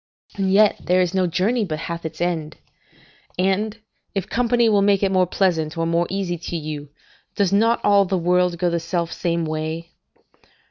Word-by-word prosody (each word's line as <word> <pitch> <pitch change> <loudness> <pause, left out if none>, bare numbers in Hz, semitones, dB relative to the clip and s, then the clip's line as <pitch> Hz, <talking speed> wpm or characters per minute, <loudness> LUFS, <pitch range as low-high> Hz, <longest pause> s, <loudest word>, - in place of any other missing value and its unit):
and 195 -1 0
yet 210 +2 +5
there 180 +1 +2
is 180 0 +1
no 185 -1 +2
journey 205 +8 +1
but 160 -6 -3
hath 165 +1 -6
its 160 - -11
end. 165 -3 -2 0.8
And, 195 +4 0 0.4
if 195 - -2
company 240 -1 +2
will 205 -2 +3
make 200 0 +3
it 195 - +2
more 185 -1 +3
pleasant 165 -4 0
or 165 - 0
more 170 +1 +1
easy 185 -3 -2
to 170 +1 -4
you, 150 -2 -6 0.5
does 200 -2 +1
not 230 +3 +3
all 200 -1 +5
the 190 0 -1
world 180 0 +1
go 175 0 0
the 170 - 0
self 170 0 -2
same 170 -1 -1
way? 160 +2 -4
180 Hz, 185 wpm, -22 LUFS, 165-195 Hz, 0.8 s, yet